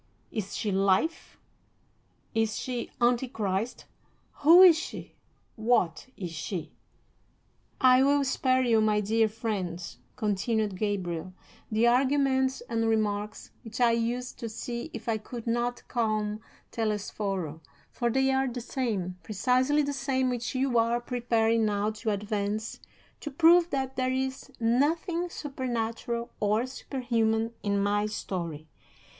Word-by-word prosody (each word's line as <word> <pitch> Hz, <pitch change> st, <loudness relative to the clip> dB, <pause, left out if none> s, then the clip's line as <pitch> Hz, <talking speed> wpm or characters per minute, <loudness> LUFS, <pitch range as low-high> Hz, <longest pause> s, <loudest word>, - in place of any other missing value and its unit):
Is 210 Hz, -4 st, -4 dB
she 210 Hz, -, -1 dB
Life? 195 Hz, -, +1 dB, 1.0 s
Is 225 Hz, 0 st, 0 dB
she 245 Hz, -2 st, -4 dB
Antichrist? 240 Hz, -3 st, 0 dB, 0.6 s
Who 335 Hz, +5 st, +9 dB
is 355 Hz, -3 st, +9 dB
she? 320 Hz, -, -6 dB, 0.4 s
What 220 Hz, -6 st, +1 dB
is 180 Hz, -4 st, -5 dB
she?'" 165 Hz, +3 st, -4 dB
V. -, -, -16 dB, 1.1 s
"I 255 Hz, -1 st, +6 dB
will 280 Hz, +1 st, +4 dB
spare 260 Hz, -1 st, +2 dB
you, 230 Hz, -3 st, +3 dB
my 215 Hz, -1 st, +3 dB
dear 220 Hz, +2 st, +2 dB
friends," 185 Hz, -, -4 dB, 0.2 s
continued 210 Hz, 0 st, 0 dB
Gabriel, 185 Hz, -4 st, -2 dB, 0.4 s
"the 220 Hz, +2 st, +3 dB
arguments 265 Hz, +1 st, +2 dB
and 225 Hz, -1 st, -1 dB
remarks 210 Hz, -1 st, -1 dB
which 225 Hz, +1 st, -8 dB
I 240 Hz, -1 st, +5 dB
used 235 Hz, +2 st, -2 dB
to 230 Hz, -, -4 dB
see 235 Hz, +2 st, -5 dB
if 230 Hz, +1 st, -8 dB
I 220 Hz, -1 st, 0 dB
could 235 Hz, +2 st, -8 dB
not 240 Hz, +1 st, -1 dB
calm 215 Hz, -2 st, -1 dB, 0.3 s
Telesforo, 200 Hz, -7 st, -2 dB, 0.3 s
for 240 Hz, -, -1 dB
they 265 Hz, +2 st, +2 dB
are 265 Hz, 0 st, +2 dB
the 245 Hz, 0 st, -4 dB
same, 215 Hz, -8 st, -3 dB
precisely 255 Hz, +7 st, +2 dB
the 285 Hz, 0 st, -2 dB
same, 260 Hz, -1 st, 0 dB
which 245 Hz, +1 st, -3 dB
you 255 Hz, -2 st, +2 dB
are 230 Hz, +1 st, +2 dB
preparing 230 Hz, -2 st, +1 dB
now 210 Hz, 0 st, +1 dB
to 220 Hz, +1 st, -4 dB
advance 210 Hz, +1 st, -2 dB, 0.4 s
to 295 Hz, -, -5 dB
prove 335 Hz, +4 st, +5 dB
that 265 Hz, -3 st, -2 dB
there 255 Hz, 0 st, +1 dB
is 265 Hz, +1 st, -3 dB
nothing 320 Hz, +9 st, +1 dB
supernatural 235 Hz, -5 st, -3 dB
or 210 Hz, +3 st, +1 dB
superhuman 230 Hz, -4 st, -1 dB
in 200 Hz, -1 st, 0 dB
my 205 Hz, +1 st, +1 dB
story. 170 Hz, -7 st, -5 dB
230 Hz, 130 wpm, -28 LUFS, 210-255 Hz, 1.1 s, Who